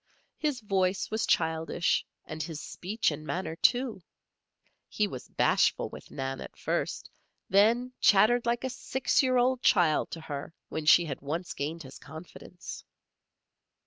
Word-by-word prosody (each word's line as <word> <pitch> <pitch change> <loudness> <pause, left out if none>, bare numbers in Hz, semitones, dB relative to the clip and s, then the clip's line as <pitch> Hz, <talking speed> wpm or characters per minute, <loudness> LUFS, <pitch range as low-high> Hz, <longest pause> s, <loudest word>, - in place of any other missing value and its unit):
His 295 -5 -1
voice 190 -2 0
was 220 0 -1
childish, 160 +1 +1 0.2
and 155 -1 -6
his 155 0 -5
speech 205 +4 -2
and 150 +1 -6
manner, 165 +1 -3
too. 245 +2 +2 0.9
He 210 - 0
was 130 -10 -8
bashful - - +2
with - - -11
Nan 135 0 -4
at - - -10
first; - - -2 0.4
then 230 +6 +4
chattered 235 +4 +5
like 240 +1 0
a 260 - -2
six 265 0 0
year 255 -2 +2
old 250 +1 +2
child 170 -10 +3
to 165 - -7
her 150 +1 -6
when 155 -1 -4
she 175 +2 +7
had 140 -4 -5
once 160 +6 -4
gained 160 +4 -4
his 130 0 -11
confidence. 160 +2 -10
180 Hz, 145 wpm, -29 LUFS, 155-235 Hz, 0.9 s, she